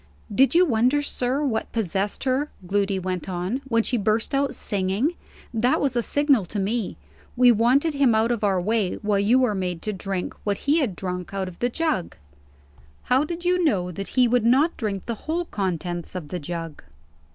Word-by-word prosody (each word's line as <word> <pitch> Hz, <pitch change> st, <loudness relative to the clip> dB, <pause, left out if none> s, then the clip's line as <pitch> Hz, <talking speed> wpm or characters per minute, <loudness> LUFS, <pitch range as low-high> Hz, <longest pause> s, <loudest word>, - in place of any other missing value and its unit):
"Did 270 Hz, +8 st, +4 dB
you 360 Hz, +1 st, +6 dB
wonder, 255 Hz, +2 st, +2 dB
sir, 265 Hz, 0 st, 0 dB
what 225 Hz, -5 st, -2 dB
possessed 200 Hz, -2 st, -1 dB
her," 270 Hz, +3 st, 0 dB, 0.2 s
Gloody 195 Hz, +1 st, 0 dB
went 185 Hz, 0 st, -3 dB
on, 185 Hz, +8 st, -2 dB
"when 230 Hz, -3 st, +2 dB
she 245 Hz, -, +1 dB
burst 215 Hz, +3 st, 0 dB
out 275 Hz, -1 st, +1 dB
singing? 205 Hz, -, 0 dB, 0.4 s
That 240 Hz, +3 st, +2 dB
was 270 Hz, -3 st, 0 dB
a 240 Hz, -, +2 dB
signal 280 Hz, -4 st, +2 dB
to 205 Hz, -, -6 dB
me. 215 Hz, +2 st, -2 dB, 0.4 s
We 250 Hz, 0 st, +7 dB
wanted 250 Hz, +8 st, +3 dB
him 275 Hz, -5 st, +3 dB
out 225 Hz, +2 st, +2 dB
of 235 Hz, -3 st, -2 dB
our 195 Hz, -3 st, +2 dB
way, 210 Hz, 0 st, 0 dB
while 205 Hz, -1 st, +2 dB
you 215 Hz, +5 st, +4 dB
were 250 Hz, -4 st, +2 dB
made 180 Hz, -3 st, -3 dB
to 215 Hz, -, -2 dB
drink 190 Hz, -1 st, -4 dB
what 200 Hz, -1 st, 0 dB
he 295 Hz, +4 st, +4 dB
had 240 Hz, -, -1 dB
drunk 180 Hz, -1 st, -5 dB
out 190 Hz, -1 st, -2 dB
of 175 Hz, -2 st, -10 dB
the 245 Hz, -, +1 dB
jug." 310 Hz, -, -1 dB, 0.9 s
"How 260 Hz, +3 st, +3 dB
did 340 Hz, +3 st, -5 dB
you 360 Hz, 0 st, +2 dB
know 185 Hz, -, +1 dB
that 195 Hz, +3 st, -6 dB
he 250 Hz, -1 st, +6 dB
would 245 Hz, -1 st, +2 dB
not 270 Hz, +8 st, +3 dB
drink 200 Hz, -4 st, -3 dB
the 235 Hz, -, -2 dB, 0.2 s
whole 345 Hz, +2 st, 0 dB
contents 175 Hz, -, -3 dB
of 165 Hz, -5 st, -6 dB
the 180 Hz, -, -4 dB
jug?" 165 Hz, 0 st, -6 dB
220 Hz, 195 wpm, -24 LUFS, 190-260 Hz, 0.9 s, We